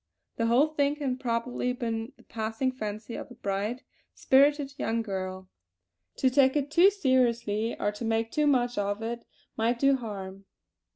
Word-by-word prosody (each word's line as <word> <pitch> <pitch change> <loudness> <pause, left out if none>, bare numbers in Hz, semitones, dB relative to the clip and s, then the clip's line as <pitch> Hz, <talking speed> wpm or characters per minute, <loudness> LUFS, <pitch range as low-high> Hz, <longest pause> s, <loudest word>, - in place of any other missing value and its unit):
The 230 - +1
whole 245 +5 +5
thing 290 -1 +1
had 265 -4 -2
probably 245 +1 -1
been 230 0 -4
the - - -20
passing 225 +4 -2
fancy 215 -2 -6
of - - -6
a 245 - -12
bright, 210 +3 -3 0.3
spirited 280 +1 +3
young 230 0 0
girl; 190 -2 -5 0.7
to 260 - +2
take 265 0 +4
it 290 -1 -1
too 350 +5 +7
seriously, 240 - +1
or 205 - 0
to 210 +3 -8
make 225 0 0
too 300 -1 +1
much 245 -4 +2
of 205 +2 -2
it 235 +1 -4 0.3
might 230 +2 +1
do 275 +2 +4
harm. 195 -5 -7
235 Hz, 165 wpm, -28 LUFS, 220-265 Hz, 0.7 s, too